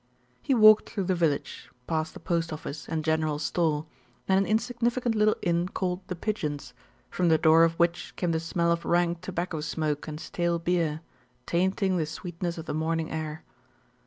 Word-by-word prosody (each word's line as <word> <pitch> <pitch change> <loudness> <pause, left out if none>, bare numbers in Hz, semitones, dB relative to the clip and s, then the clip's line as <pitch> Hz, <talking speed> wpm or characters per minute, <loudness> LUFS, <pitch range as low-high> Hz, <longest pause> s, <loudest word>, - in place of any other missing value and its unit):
He 270 - +1
walked 215 -2 +7
through 200 -4 -2
the 185 +1 +1
village, 165 -5 -1 0.2
past 160 -1 -2
the - - -8
post 170 -2 -1
office, 150 -1 -7
and 160 -1 -1
general 155 -1 +1
store, 155 -1 0 0.4
and 190 0 +4
an 195 - 0
insignificant 235 +2 0
little 215 0 +3
inn 175 -1 +1
called 180 -1 -2
The 180 - -4
Pigeons, 150 - -3 0.4
from 180 -1 +1
the 160 - +5
door 160 +1 +6
of 165 0 +3
which 170 0 0
came 175 -2 -1
the 160 - +1
smell 170 +1 0
of 170 0 0
rank 175 -1 +1
tobacco 175 -3 -3
smoke 150 -1 -2
and 155 0 -5
stale 170 +1 -1
beer, 165 -2 0 0.4
tainting 185 +2 +1
the 160 -3 0
sweetness 170 +2 -5
of 165 - -6
the - - -3
morning 160 +1 -1
air. 155 0 -4
170 Hz, 180 wpm, -27 LUFS, 160-185 Hz, 0.4 s, walked